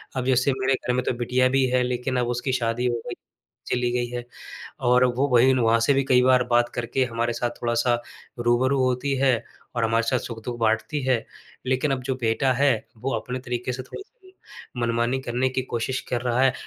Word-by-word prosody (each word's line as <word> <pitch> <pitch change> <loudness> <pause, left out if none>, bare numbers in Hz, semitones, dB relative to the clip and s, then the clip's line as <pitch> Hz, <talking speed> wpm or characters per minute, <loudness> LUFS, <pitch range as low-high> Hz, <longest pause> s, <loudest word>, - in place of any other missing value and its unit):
अब 130 -1 -2
जैसे 130 +1 +3
मेरे 130 +1 +2
घर 125 -1 -1
में 125 - 0
तो - - +1
बिटिया 125 +1 +2
भी 135 0 +2
है, 125 0 +2
लेकिन 125 +1 -2
अब 120 - 0
उसकी 120 +2 -2
शादी 120 -1 -1
हो 120 - 0
गई, - - -4 0.5
चली 125 0 0
गई 120 0 0
है 120 -1 -5 0.7
और 125 0 +5
वो 135 +3 +2
वहीं 130 +2 +5
न - - +1
वहाँ 115 -1 +3
से 140 +5 +3
भी 135 0 +2
कई 125 -1 +4
बार 125 -1 +4
बात 120 0 +3
करके 120 +2 0
हमारे 120 0 -1
साथ 120 +1 -2
थोड़ा-सा 120 0 +1 0.4
रूबरू 130 +3 +2
होती 130 +2 0
है 135 -1 +4 0.4
और 115 - 0
हमारे 115 +1 +2
साथ 130 - +2
सुख-दुख 120 +1 -6
बाँटती 110 +7 0
है। 130 -2 +1 0.4
लेकिन 130 +3 +1
अब 130 - -2
जो 130 +1 -2
बेटा 120 +3 +1
है, 140 +2 +3 0.2
वो 130 +5 -3
अपने 125 +1 -5
तरीके 125 0 -3
से 130 +1 -5
थोड़ा-सा 390 - -10 0.7
मनमानी 120 +2 0
करने 125 +1 0
की 130 0 -1
कोशिश 125 +1 -3
कर 120 - 0
रहा 125 0 0
है। 130 - +4
125 Hz, 210 wpm, -24 LUFS, 120-130 Hz, 0.7 s, और